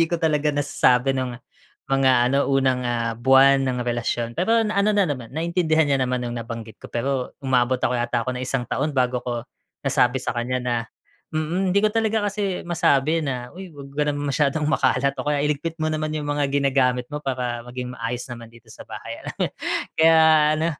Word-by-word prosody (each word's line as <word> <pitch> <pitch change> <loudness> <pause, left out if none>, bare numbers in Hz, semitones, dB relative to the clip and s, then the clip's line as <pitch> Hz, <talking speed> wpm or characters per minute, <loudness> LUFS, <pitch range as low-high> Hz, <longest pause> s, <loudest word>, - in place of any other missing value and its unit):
hindi - - +6
ko 170 - 0
talaga 150 -2 +1
nasasabi 135 -3 +2
nung 130 -2 -3 0.6
mga 135 -1 +4
ano 140 +3 +1
unang, 130 -2 +2
ah, 115 -1 -1
buwan 135 +1 +5
ng 125 -1 -2
relasyon. 120 -1 -2
Pero 225 - +2
ano 210 -1 +1
na 200 - +4
naman, 130 -8 -4
naintindihan 160 +1 +1
niya 140 -2 +1
naman 125 -1 -1
nung 120 0 -4
nabanggit 115 -2 -8
ko, - - -10
pero 130 +2 -2
umabot 130 -1 +2
ako 125 - 0
yata 120 -1 -1
ako 130 - -2
ng 125 - -5
isang 125 -1 -1
taon 145 +3 -2
bago 125 -1 +1
ko 120 -1 -4 0.4
nasabi 125 +1 +2
sa - - -2
kanya 120 +2 -1
na 125 -1 -1 0.6
mm, 165 +5 -1
hindi 200 - +3
ko 215 - +3
talaga 220 -1 +1
kasi 200 -2 -2
masabi 155 -1 +2
na, 125 -3 -3
"uy, 190 0 -8
'wag 140 -2 -10
ka 150 - +2
naman 145 0 -2
masyadong 150 +2 +1
makalat," 140 -2 +2
o - - -4
kaya 145 -1 +1
"iligpit 150 +3 -2
mo 155 - +1
naman 155 0 -2
yung 150 - -3
mga 145 0 0
ginagamit 130 -3 +2
mo 150 - -3
para 125 -3 -2
maging 125 0 -6
maayos 120 +1 -4
naman 115 -1 -9
dito 115 -1 -19
sa - - -15
bahay," - - -7
alam - - -7 0.6
kaya 160 0 +6 0.4
ano, 160 +1 0
135 Hz, 195 wpm, -23 LUFS, 125-155 Hz, 0.6 s, hindi